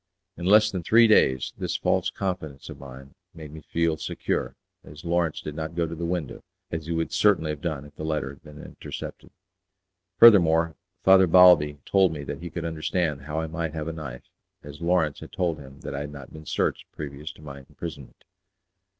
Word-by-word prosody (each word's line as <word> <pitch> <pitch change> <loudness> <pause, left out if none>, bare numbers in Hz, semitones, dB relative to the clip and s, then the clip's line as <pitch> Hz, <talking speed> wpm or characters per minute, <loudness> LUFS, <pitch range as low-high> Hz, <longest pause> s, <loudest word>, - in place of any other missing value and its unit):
In 85 - -7
less 105 +2 +6
than 95 - -3
three 115 +7 +5
days 65 - +3
this - - -2
false - - +1
confidence 90 -8 -5
of - - -9
mine 70 0 -11 0.2
made 80 -3 -10
me 80 +1 -10
feel 85 0 0
secure, - - -3 0.3
as 75 +3 -13
Lawrence 85 -2 0
did 75 - -6
not 80 +1 -5
go 85 -1 +1
to 80 - -6
the 85 +1 -4
window, 85 -6 -4 0.3
as 80 -2 -4
he - - -3
would 80 0 -1
certainly 90 -7 +3
have 75 -1 -7
done 75 -5 -3
if 75 - -16
the - - -7
letter 75 -3 -2
had 70 - -16
been 75 0 -13
intercepted. - - -9 0.9
Furthermore, 85 -8 +6 0.3
Father 95 -1 +6
Balbi 80 -4 +6
told 95 -4 +3
me 75 -2 -6
that 75 - -6
he 85 - -6
could 85 0 -5
understand 80 -2 -1
how 75 +1 -2
I - - -2
might 80 0 -4
have 80 -1 -4
a 80 - -3
knife, 70 -6 -8 0.4
as 75 +2 -11
Lawrence 85 -3 +1
had - - -11
told 85 -4 -1
him 70 0 -13
that - - -6
I 70 - -3
had 75 +1 -5
not 70 -3 -11
been 80 0 -11
searched - - -1
previous 75 +1 -7
to 75 - -17
my 70 -2 -9
imprisonment. 70 0 -10
80 Hz, 200 wpm, -25 LUFS, 75-85 Hz, 0.9 s, less